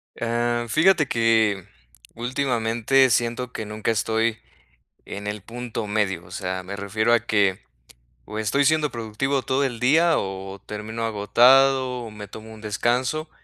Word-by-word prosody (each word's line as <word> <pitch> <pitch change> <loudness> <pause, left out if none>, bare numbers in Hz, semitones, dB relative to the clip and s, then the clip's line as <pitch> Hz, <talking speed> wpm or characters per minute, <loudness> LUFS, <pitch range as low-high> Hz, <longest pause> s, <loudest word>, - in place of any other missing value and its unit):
Eh, 120 0 -1
fíjate 155 +2 +4
que 110 -5 +2 0.5
últimamente 125 0 +1
siento 120 +2 0
que 110 - -5
nunca 105 +1 -2
estoy 110 0 0 0.7
en 100 +1 -7
el 105 0 -4
punto 115 0 -6
medio, 100 -5 -1
o 90 - -16
sea, 95 0 -4
me 100 +2 -6
refiero 110 +3 0
a 115 - +4
que, 100 -4 +1 0.6
o 105 - -7
estoy 110 +7 +1
siendo 155 0 +2
productivo 120 +4 -2
todo 135 +2 0
el 125 -4 -3
día, 160 +6 +4
o 95 0 -5
termino 110 +2 -5
agotado, 125 +4 +4
o 115 - -8
me 105 -1 -9
tomo 110 +2 -11
un 110 - -12
descanso. 125 +8 -1
115 Hz, 145 wpm, -23 LUFS, 105-125 Hz, 0.7 s, fíjate